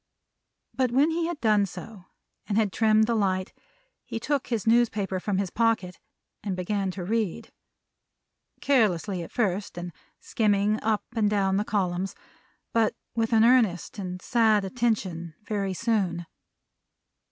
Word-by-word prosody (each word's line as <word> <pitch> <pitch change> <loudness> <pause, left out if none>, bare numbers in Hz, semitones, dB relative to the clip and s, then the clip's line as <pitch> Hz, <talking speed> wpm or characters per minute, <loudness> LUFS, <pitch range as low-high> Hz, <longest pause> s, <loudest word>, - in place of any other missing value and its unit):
But 255 -2 +1
when 280 +6 +3
he 330 0 0
had 340 -3 -4
done 210 -3 +3
so, 200 -1 -10 0.4
and 205 - 0
had 215 -3 +1
trimmed 220 -1 +4
the 235 - 0
light, 190 -3 0 0.5
he 225 - -5
took 280 +3 -1
his 230 -5 -2
newspaper 220 -5 +2
from 195 +1 -1
his 195 -2 -1
pocket 225 -6 0 0.4
and 195 -2 -2
began 195 +2 -1
to 185 0 -5
read. 215 -1 -2 1.1
Carelessly 205 - +2
at 165 - -8
first, 200 -6 -1
and 175 -1 -6 0.3
skimming 210 -1 +1
up 215 -1 0
and 215 -2 +2
down 195 -2 +1
the 205 - +1
columns; 190 -3 -1 0.6
but 225 -2 +2 0.2
with 225 0 0
an 225 -1 +5
earnest 225 -8 +3
and 180 -2 -5
a - - -20
sad 220 -4 +3
attention, 190 -7 -2
very 200 -3 -2
soon. 190 -6 0
210 Hz, 145 wpm, -26 LUFS, 185-225 Hz, 1.1 s, an